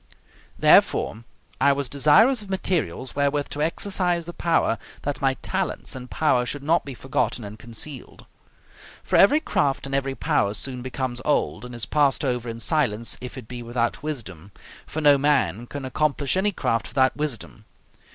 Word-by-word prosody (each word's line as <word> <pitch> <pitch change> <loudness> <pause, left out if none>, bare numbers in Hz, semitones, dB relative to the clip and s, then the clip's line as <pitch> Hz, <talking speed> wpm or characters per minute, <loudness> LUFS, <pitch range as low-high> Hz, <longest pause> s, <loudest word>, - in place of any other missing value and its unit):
Therefore, 115 +2 +4 0.3
I 140 - +5
was 140 -1 -2
desirous 155 - +4
of 205 - -11
materials 155 - -2
wherewith 140 0 0
to 145 - -4
exercise 175 +1 0
the 175 - -7
power, 165 -11 +1 0.2
that 140 -3 -3
my 135 -1 +2
talents - - -2
and 125 -1 -8
power 140 -6 +2
should 140 +3 -5
not 165 +4 +2
be 135 -2 -6
forgotten 125 -1 -1
and 105 +1 -9
concealed. 120 +3 -7 0.8
For - - -1
every 245 +10 +6
craft 140 - 0
and 135 - -6
every 135 0 -1
power 100 -4 +1
soon 125 +3 -3
becomes 130 -1 -4
old, 150 -4 0
and 125 0 -8
is 120 - -4
passed 145 -1 +2
over 125 -2 -1
in 115 0 -6
silence, 115 -5 0
if 125 +2 -7
it 125 -4 -9
be 125 0 -7
without 120 0 -2
wisdom: 105 - -6 0.4
for 155 - -4
no 145 -2 +6
man 125 - +1
can 140 0 -6
accomplish 140 +2 0
any 200 +2 +2
craft 115 -10 -1
without 130 -1 +2
wisdom. 135 -7 -4
135 Hz, 170 wpm, -24 LUFS, 120-150 Hz, 0.8 s, every